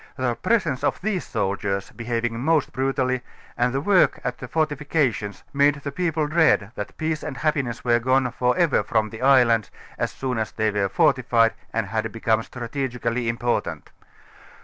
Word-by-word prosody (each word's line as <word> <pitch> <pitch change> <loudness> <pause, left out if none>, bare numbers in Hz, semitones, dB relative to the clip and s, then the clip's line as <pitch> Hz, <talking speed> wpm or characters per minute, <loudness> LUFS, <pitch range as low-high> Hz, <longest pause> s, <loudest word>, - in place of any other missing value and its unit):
The 130 -3 0
presence 165 - 0
of - - 0
these 195 -2 -2
soldiei┬╗s, 100 -2 -2
be 120 - -7
having 115 -1 -1
most 155 +2 +1
brutallj^ 130 -1 0 0.3
and 125 +1 +1
the 135 - -1
work 190 +3 +3
at 125 0 -3
the 125 - -7
fortifications, 145 - -1
made 145 +1 +4
the 140 -1 -6
people 160 -1 0
dread, 155 -10 +3
that 105 - -7
peace 155 -1 -1
and 150 -3 -6
happiness 140 -7 -1
were 120 -1 +4
gone 130 +1 +2
for 125 +4 0
ever 170 -6 +3
from 110 -2 0
the 110 - -9
islands 125 -5 +4 0.3
as - - -1
soon 130 -3 -3
as 110 - -3
they 110 -1 0
were 100 -1 0
fortified 125 - +3 0.2
and 115 -2 -1
had 110 +2 -2
become 115 0 +1
strategically 120 -1 -3
important. 120 +1 -2
125 Hz, 170 wpm, -23 LUFS, 115-145 Hz, 0.3 s, made